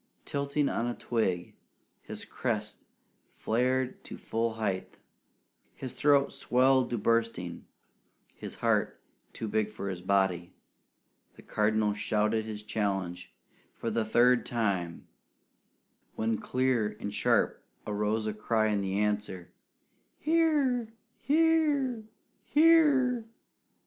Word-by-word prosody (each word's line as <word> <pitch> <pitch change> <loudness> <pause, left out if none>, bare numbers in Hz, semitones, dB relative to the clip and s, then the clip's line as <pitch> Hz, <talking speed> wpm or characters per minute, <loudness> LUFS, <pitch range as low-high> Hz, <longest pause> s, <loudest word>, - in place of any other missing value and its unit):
Tilting 140 +1 -1
on 115 - -1
a 120 - -2
twig, 95 -7 -1 0.5
his - - -8
crest 105 -3 -4 0.4
flared 125 +3 -1
to - - -8
full 115 0 -2
height, 100 -4 -3 0.8
his 130 - -7
throat 140 -1 +3
swelled 130 +1 +3
to 120 - -1
bursting, 115 -5 -1 0.7
his - - -9
heart - - 0 0.3
too 110 - -5
big 105 0 0
for 105 -2 -5
his 90 -2 -5
body, 95 -2 0 0.8
the - - -15
Cardinal 105 0 +1
shouted 110 +1 0
his 105 -1 -7
challenge 95 -5 -3 0.4
for 115 - -3
the 115 +1 0
third 120 +3 +4
time; 100 -8 -2 1.1
when 110 0 -1
clear 125 -5 0
and 100 - -5
sharp - - +1 0.2
arose 105 +1 -1
a 110 - -2
cry 110 +1 +1
in 105 -1 0
answer, 100 -2 -2 0.7
"Here! 295 -7 +2 0.3
Here! 290 -5 +2 0.4
Here!" 290 -7 +4
110 Hz, 110 wpm, -29 LUFS, 105-135 Hz, 1.1 s, third